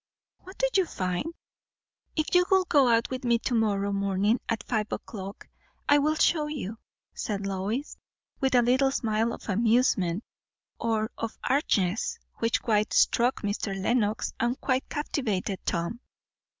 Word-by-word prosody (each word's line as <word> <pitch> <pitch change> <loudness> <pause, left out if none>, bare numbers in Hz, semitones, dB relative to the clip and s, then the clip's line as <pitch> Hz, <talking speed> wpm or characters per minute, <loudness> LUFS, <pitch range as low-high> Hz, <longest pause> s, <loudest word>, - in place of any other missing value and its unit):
"What 375 +1 -13
do - - +2
you 375 -3 +3
find?" 180 - -2 0.9
"If 310 -1 -1
you 360 0 +5
will 380 -1 +4
go 285 -7 +4
out 230 +1 +2
with 260 +1 -4
me 235 -1 +3
to 240 +2 -3
morrow 200 -3 +1
morning 200 +3 +1
at 230 -1 -1
five 215 -3 -2
o'clock, 195 -1 -7 0.4
I 290 0 +6
will 305 +2 +2
show 310 -1 +2
you," 230 -8 -5 0.3
said 200 -2 -3
Lois, 195 +8 -3 0.4
with 265 -1 +1
a 245 - +6
little 260 +3 +3
smile 225 -3 0
of - - -8
amusement, 215 -3 +2 0.6
or 220 -1 0
of 225 - -4
archness, 220 - +1 0.2
which 230 0 +1
quite 215 -2 +1
struck 240 +1 +3
Mr. 200 -1 -2
Lenox 215 +1 0
and 240 +2 0
quite 260 -1 0
captivated 215 -10 -2
Tom. 170 +7 -1
230 Hz, 150 wpm, -27 LUFS, 200-265 Hz, 0.9 s, I